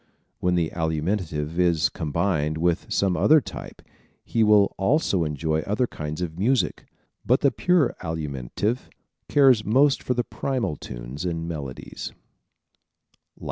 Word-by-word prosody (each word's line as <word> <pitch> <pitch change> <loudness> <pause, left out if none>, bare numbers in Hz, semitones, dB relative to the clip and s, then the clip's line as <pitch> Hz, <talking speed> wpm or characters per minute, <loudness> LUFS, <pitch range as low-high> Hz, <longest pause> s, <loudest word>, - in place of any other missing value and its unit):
When 90 0 +1
the 85 -2 0
Alimentive 80 -1 -2
is 85 -4 +3
combined 80 0 -1
with 85 +1 0
some 95 -3 +2
other 155 - +5
type - - -9 0.4
he 115 - +1
will 105 -2 +5
also 95 - +1
enjoy 80 +1 -1
other 105 +10 0
kinds 75 -5 -5
of 85 0 -5
music 125 +6 0 0.4
but 125 - +2
the 140 - +4
pure 180 -7 +2
Alimentive 80 - -3 0.4
cares 130 -6 +5
most 135 +6 +3
for 125 - -1
primal 125 - -2
tunes - - -7
and 85 -2 -3
melodies. 70 -6 -6
90 Hz, 125 wpm, -24 LUFS, 80-115 Hz, 0.4 s, other